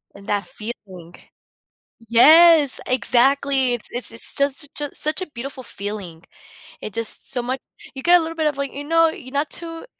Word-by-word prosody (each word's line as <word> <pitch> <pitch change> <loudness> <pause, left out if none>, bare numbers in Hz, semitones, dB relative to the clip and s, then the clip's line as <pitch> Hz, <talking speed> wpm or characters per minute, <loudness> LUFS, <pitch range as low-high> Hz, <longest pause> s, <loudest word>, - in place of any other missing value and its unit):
And 200 0 -15
that 205 -1 -1
feeling. 190 -6 -10 0.9
Yes! 310 +3 +6
Exactly, 260 +1 +2
it's 240 - -4
it's 245 -1 +1
it's 230 - -4
just 280 0 0
such 290 -1 -5
a - - -14
such 305 +5 -1
a 370 - -6
beautiful 265 +2 -7
feeling. 200 -6 -7 0.6
It 215 - -7
just 230 +4 +1
so 250 -2 0
much 255 +2 -4 0.4
you 265 - -8
get 350 +1 +5
a - - -2
little 330 0 -5
bit 315 -1 0
of, 295 -2 -2
like 280 -1 -4
you 285 - -7
know, 330 +2 +3
you're 260 -4 -11
not 285 +2 -1
too 330 +3 -4
265 Hz, 185 wpm, -20 LUFS, 230-300 Hz, 0.9 s, Yes